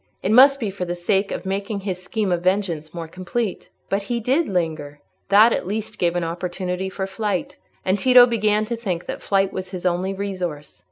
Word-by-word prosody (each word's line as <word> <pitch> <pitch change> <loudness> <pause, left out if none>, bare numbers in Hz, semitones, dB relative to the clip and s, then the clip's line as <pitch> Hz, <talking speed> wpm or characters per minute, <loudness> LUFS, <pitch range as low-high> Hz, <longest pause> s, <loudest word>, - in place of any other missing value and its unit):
It 195 - +1
must 275 +4 +7
be 215 -6 -2
for 190 -1 -5
the 175 0 -3
sake 195 +3 0
of 180 - -4
making 200 +2 -3
his 185 -2 -4
scheme 200 +1 -2
of 175 -1 +1
vengeance 180 -4 0
more 170 -2 -6
complete. 185 +5 -4 0.2
But 195 +1 0
he 235 +4 -2
did 270 +8 +1
linger: 155 -5 -2 0.3
that 215 +4 +7
at - - -2
least 210 +1 -4
gave 175 -1 +1
an 175 - 0
opportunity 180 +2 -3
for 190 0 -4
flight. 220 +8 -3 0.3
And 190 +2 +1
Tito 250 +2 +8
began 215 -2 +1
to 235 +2 -3
think 190 -7 -3
that - - -5
flight 195 -1 +1
was 185 0 -5
his 185 -1 -7
only 180 +2 0
resource. 180 - -5
190 Hz, 205 wpm, -22 LUFS, 180-215 Hz, 0.3 s, Tito